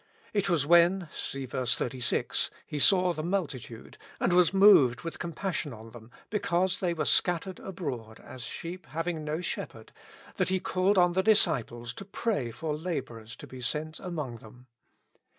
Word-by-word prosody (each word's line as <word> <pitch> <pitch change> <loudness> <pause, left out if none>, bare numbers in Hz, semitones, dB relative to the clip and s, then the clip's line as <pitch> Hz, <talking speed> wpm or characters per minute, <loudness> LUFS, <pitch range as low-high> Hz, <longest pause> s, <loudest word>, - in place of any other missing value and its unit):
It 200 -2 +1
was 165 -6 +2
when 175 +2 +4
(see 135 -1 -4
ver. 125 0 -3
36) 125 +1 +1 0.2
"He 150 - -5
saw 180 +3 +5
the 155 - -4
multitude, 155 - -4 0.2
and - - +1
was 180 -2 +5
moved 190 -11 +6
with 165 -1 -6
compassion 170 -4 -3
on 110 0 -11
them, 115 -1 -13 0.2
because 190 -3 0
the)' 175 -2 0
were 155 -2 -1
scattered 180 +4 +1
abroad, 130 - -6
as 130 - -11
sheep 170 +9 -6
having 165 0 -3
no 155 +2 -3
shepherd," - - -6 0.5
that - - +1
He 190 0 +1
called 190 +2 +1
on 175 -1 +4
the 190 - +2
disciples 120 - +2
to 195 - -8
pray 200 - -2
for 150 +6 -4
laborers 125 -9 -5
to - - -11
be 130 -1 -10
sent 155 +5 -3
among 150 -10 -5
them. 120 +3 -15
165 Hz, 165 wpm, -29 LUFS, 125-185 Hz, 0.5 s, moved